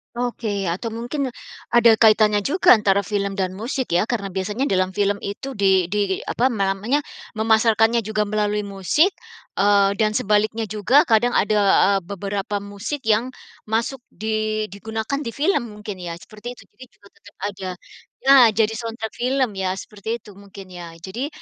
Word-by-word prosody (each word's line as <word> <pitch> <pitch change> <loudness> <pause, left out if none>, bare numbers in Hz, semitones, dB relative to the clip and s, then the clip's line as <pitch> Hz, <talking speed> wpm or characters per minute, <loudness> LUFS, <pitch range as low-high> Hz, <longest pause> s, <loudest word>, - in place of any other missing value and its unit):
Oke. 240 -2 -3 0.2
Atau 195 +7 -4
mungkin, 260 +4 -3 0.5
ada 235 -1 +7
kaitannya 215 -2 +5
juga 290 - +3
antara 200 -3 +4
film 200 0 -2
dan 185 -2 -1
musik 235 +5 -4
ya? 180 +6 +2
Karena 200 -5 -3
biasanya 205 +7 -2
dalam 185 -6 0
film 205 0 +1
itu 205 +7 -6
di 190 -2 +3
di 200 -2 -1
apa, 250 +3 +1
ma 200 -6 0
namanya, 240 +10 -1 0.3
memasarkannya 225 +1 +3
juga 215 -1 -1
melalui 210 0 -1
musik, 200 - +1 0.5
eee, 200 0 +4
dan 215 0 +1
sebaliknya 215 +2 +1
juga, 240 +8 +4
kadang 240 +1 +2
ada, 210 +1 +2 0.3
eee, 195 0 +3
beberapa 200 +1 -3
musik 205 +8 -6
yang 220 +3 +2 0.4
masuk 230 +5 -1
di 215 0 -2
digunakan 220 +6 -4
di 235 -6 -4
film 295 0 +1
mungkin 210 -2 -7
ya, 170 -1 -5
seperti 210 +6 -12
itu - - -15
jadi 255 - -14
juga 200 - -20
tetap 205 - -19 0.2
ada. 190 -1 -7 0.6
Nah, 270 -2 +8 0.2
jadi 220 0 +3
soundtrack 225 -1 -5
film 260 -1 +1
ya, 190 -1 -2
seperti 210 +1 -10
itu 210 - -13
mungkin 195 -1 -11
ya. 170 - -7
Jadi, 195 - -5
215 Hz, 165 wpm, -22 LUFS, 200-235 Hz, 0.6 s, Nah